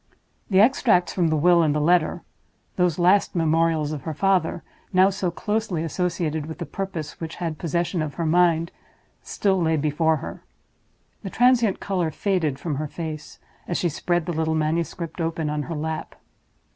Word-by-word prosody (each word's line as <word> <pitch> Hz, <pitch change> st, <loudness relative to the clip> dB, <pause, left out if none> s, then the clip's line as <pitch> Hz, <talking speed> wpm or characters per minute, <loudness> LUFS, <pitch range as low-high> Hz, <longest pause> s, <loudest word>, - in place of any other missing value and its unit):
The 190 Hz, -2 st, +4 dB
extracts 220 Hz, -5 st, +3 dB
from 175 Hz, -3 st, +1 dB
the 155 Hz, -, +1 dB
will 175 Hz, +3 st, +5 dB
and 150 Hz, -2 st, +2 dB
the -, -, +1 dB
letter—those 175 Hz, +1 st, -1 dB
last 185 Hz, +3 st, +3 dB
memorials 160 Hz, -2 st, +1 dB
of 150 Hz, -3 st, -4 dB
her 155 Hz, +3 st, -5 dB
father, 180 Hz, -2 st, +1 dB, 0.3 s
now 190 Hz, +1 st, +5 dB
so 190 Hz, -2 st, -2 dB
closely 210 Hz, -2 st, -2 dB
associated 165 Hz, -2 st, -2 dB
with 160 Hz, -, -7 dB
the -, -, -5 dB
purpose 185 Hz, -6 st, -5 dB
which 165 Hz, 0 st, -5 dB
had 165 Hz, -3 st, -4 dB
possession 170 Hz, +1 st, -1 dB
of 150 Hz, -2 st, -4 dB
her 170 Hz, -, -2 dB
mind—still 175 Hz, +3 st, 0 dB
lay 160 Hz, -1 st, +2 dB
before 155 Hz, +2 st, +1 dB
her. -, -, -8 dB, 0.8 s
The 195 Hz, -, -5 dB
transient 240 Hz, -2 st, +3 dB
color 180 Hz, -4 st, -1 dB
faded 160 Hz, -4 st, -1 dB
from 145 Hz, 0 st, -3 dB
her 155 Hz, +1 st, -3 dB
face, 155 Hz, -1 st, -7 dB, 0.3 s
as 175 Hz, -, -1 dB
she 175 Hz, -, 0 dB
spread 175 Hz, +2 st, -1 dB
the 175 Hz, -, -3 dB
little 160 Hz, 0 st, 0 dB
manuscript 165 Hz, +2 st, -2 dB
open 165 Hz, -2 st, -2 dB
on 150 Hz, 0 st, -1 dB
her 165 Hz, -, -3 dB
lap. 155 Hz, +1 st, -4 dB
165 Hz, 165 wpm, -24 LUFS, 155-180 Hz, 0.8 s, will